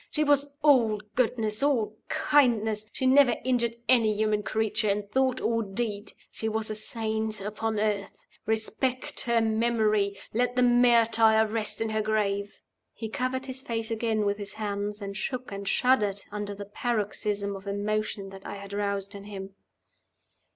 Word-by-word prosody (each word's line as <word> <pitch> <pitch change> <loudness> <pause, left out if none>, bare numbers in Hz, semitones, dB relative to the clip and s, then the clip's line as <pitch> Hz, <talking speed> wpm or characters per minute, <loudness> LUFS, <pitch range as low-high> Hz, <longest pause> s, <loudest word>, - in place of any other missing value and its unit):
"She 305 - 0
was 285 -1 +2
all 235 -8 +5
goodness, 225 -3 0
all 235 -7 +1
kindness; 220 -7 +2
she 260 - -3
never 260 -2 +6
injured 235 -2 +1
any 230 -3 +5
human 215 0 +1
creature 220 0 0
in 205 +1 +1
thought 260 +5 0
or 230 0 +1
deed. 205 0 -4 0.2
She 220 - -3
was 220 0 -2
a - - -3
saint 220 0 -1
upon 215 +2 -2
earth. 205 -2 -1 0.3
Respect 220 +4 -1
her 235 -1 +3
memory! 220 -3 +1 0.2
Let 245 +2 +1
the 250 - +3
martyr 230 -2 +5
rest 220 0 -2
in 225 - 0
her 215 0 0
grave!" 205 -2 -1 0.3
He 225 -1 -5
covered 260 +1 -2
his 260 0 -4
face 225 -2 -3
again 220 -2 0
with 200 +1 0
his 205 -1 -5
hands, 205 -1 -3
and 200 0 -5
shook 255 +3 -4
and 200 0 -6
shuddered 210 -6 +2
under 205 -1 -4
the 200 0 -7
paroxysm 205 -2 -2
of 195 +1 -10
emotion 205 0 -2
that 195 0 -11
I - - -6
had 200 0 -9
roused 200 0 -2
in 200 0 -9
him. 195 -1 -8
220 Hz, 160 wpm, -27 LUFS, 205-235 Hz, 0.3 s, never